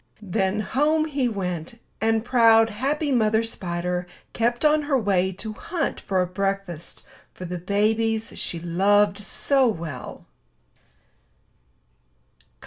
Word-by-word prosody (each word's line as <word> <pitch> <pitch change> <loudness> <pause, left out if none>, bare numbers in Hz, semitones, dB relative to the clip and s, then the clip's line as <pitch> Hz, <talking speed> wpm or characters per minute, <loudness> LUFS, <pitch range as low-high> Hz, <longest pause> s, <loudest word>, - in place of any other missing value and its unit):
Then 195 +1 0
home 300 +8 +1
he 275 -5 0
went; 180 0 -4 0.2
and 225 0 +1
proud, 225 -2 +5
happy 285 +7 -1
Mother 220 -2 +2
Spider 180 -4 -3 0.3
kept 240 +4 0
on 305 0 +4
her 275 - +4
way 190 -5 +1
to 215 +4 -5
hunt 340 +9 -3
for 190 -2 0
a - - -1
breakfast 195 -2 -4 0.3
for 185 - -7
the 180 0 -5
babies 220 +4 0
she 170 - -4
loved 200 +4 +2
so 265 +6 +2
well. 160 - -5
210 Hz, 120 wpm, -24 LUFS, 185-235 Hz, 0.3 s, proud